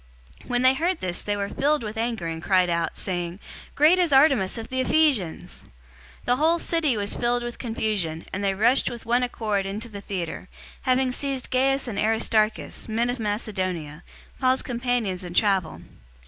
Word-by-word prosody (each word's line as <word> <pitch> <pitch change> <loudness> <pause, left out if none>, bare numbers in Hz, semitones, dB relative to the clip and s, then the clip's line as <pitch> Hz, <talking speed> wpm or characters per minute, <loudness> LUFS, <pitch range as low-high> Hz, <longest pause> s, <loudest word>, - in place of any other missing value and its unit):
019:028 - - -17
When 245 0 +1
they 260 0 +6
heard 345 +6 0
this 180 -1 -3
they 205 0 -2
were 200 0 -2
filled 295 -1 +1
with 215 0 -5
anger, 225 -4 -2
and 165 0 -4
cried 185 0 +2
out, 170 0 -1
saying, 175 -1 -3 0.4
"Great 315 +5 +5
is 350 -4 +2
Artemis 270 -8 +4
of 225 - -6
the 260 - -2
Ephesians!" 260 - +1 0.6
019:029 - - -22
The 245 - +3
whole 320 +4 +3
city 320 -8 0
was 205 0 -2
filled 240 0 0
with 240 0 -6
confusion, 210 -9 -2
and 195 +2 -3
they 195 -1 +1
rushed 235 +7 +3
with 235 -2 -8
one 240 +2 +2
accord 215 -5 -1
into 215 +4 -5
the 200 -2 -8
theater, 180 -2 -5 0.3
having 255 0 +2
seized 270 -1 -3
Gaius 270 +1 +2
and 205 -4 -3
Aristarchus, 220 0 +1
men 235 +2 +1
of 250 - -5
Macedonia, 185 -8 -3 0.4
Paul's 260 0 +2
companions 240 -7 -1
in 175 -1 -7
travel. 195 -6 +1
225 Hz, 180 wpm, -25 LUFS, 195-255 Hz, 0.6 s, they